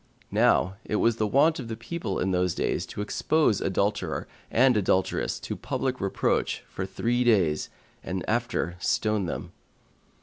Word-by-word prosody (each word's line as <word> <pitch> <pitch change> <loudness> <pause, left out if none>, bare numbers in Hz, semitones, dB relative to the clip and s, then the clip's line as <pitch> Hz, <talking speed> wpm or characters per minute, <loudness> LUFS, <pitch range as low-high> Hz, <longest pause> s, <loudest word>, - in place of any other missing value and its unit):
Now 95 +2 +3
it - - -3
was 115 +1 +2
the 110 - +1
wont 145 +8 +3
of 125 - -5
the 110 -1 -5
people 170 +9 -4
in 95 - 0
those 90 -1 +1
days - - -1
to - - -5
expose 145 +2 +1
adulterer 100 +2 -1 0.2
and 125 +1 +4
adulteress 95 -2 +1
to - - -4
public 130 -1 -2
reproach 100 0 0
for - - -5
three 120 +1 0
days, 95 -11 +2 0.3
and 95 0 -4
after 115 -7 -1
stone 105 +1 0
them. - - -5
110 Hz, 155 wpm, -27 LUFS, 95-120 Hz, 0.3 s, and